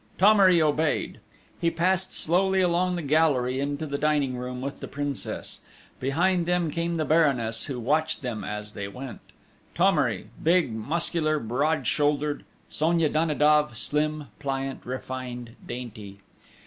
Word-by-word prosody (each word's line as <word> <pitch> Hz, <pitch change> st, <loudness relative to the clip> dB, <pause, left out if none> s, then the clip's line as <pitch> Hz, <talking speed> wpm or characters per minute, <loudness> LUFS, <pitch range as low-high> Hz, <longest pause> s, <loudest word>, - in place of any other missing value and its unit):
Thomery 195 Hz, -3 st, +6 dB
obeyed. 155 Hz, 0 st, 0 dB, 0.4 s
He 170 Hz, -, +2 dB
passed 185 Hz, +3 st, +1 dB
slowly 190 Hz, +3 st, +2 dB
along 180 Hz, 0 st, +2 dB
the 175 Hz, -, -3 dB
gallery 140 Hz, -4 st, +2 dB
into 145 Hz, +2 st, -2 dB
the 140 Hz, -1 st, -3 dB
dining 145 Hz, -4 st, +1 dB
room 125 Hz, 0 st, -5 dB
with 140 Hz, +2 st, -5 dB
the -, -, -6 dB
Princess. 145 Hz, -1 st, -4 dB, 0.4 s
Behind 170 Hz, +6 st, +1 dB
them 175 Hz, -3 st, +1 dB
came 170 Hz, +2 st, -1 dB
the 155 Hz, -2 st, 0 dB
Baroness, 135 Hz, -9 st, +2 dB
who 130 Hz, -3 st, -4 dB
watched 155 Hz, +6 st, 0 dB
them 120 Hz, -4 st, -3 dB
as 105 Hz, 0 st, -5 dB
they 100 Hz, -2 st, -5 dB
went: 125 Hz, +5 st, -8 dB, 0.6 s
Thomery, -, -, +2 dB
big, 165 Hz, -7 st, +3 dB
muscular, 155 Hz, +6 st, 0 dB
broad 140 Hz, +4 st, 0 dB
shouldered: 145 Hz, 0 st, +1 dB, 0.2 s
Sonia 165 Hz, 0 st, +1 dB
Danidoff, 150 Hz, -4 st, +2 dB
slim, 150 Hz, +1 st, -1 dB
pliant, 135 Hz, -1 st, -3 dB
refined, 125 Hz, -2 st, -6 dB
dainty! 105 Hz, -5 st, -8 dB
150 Hz, 135 wpm, -26 LUFS, 130-165 Hz, 0.6 s, Thomery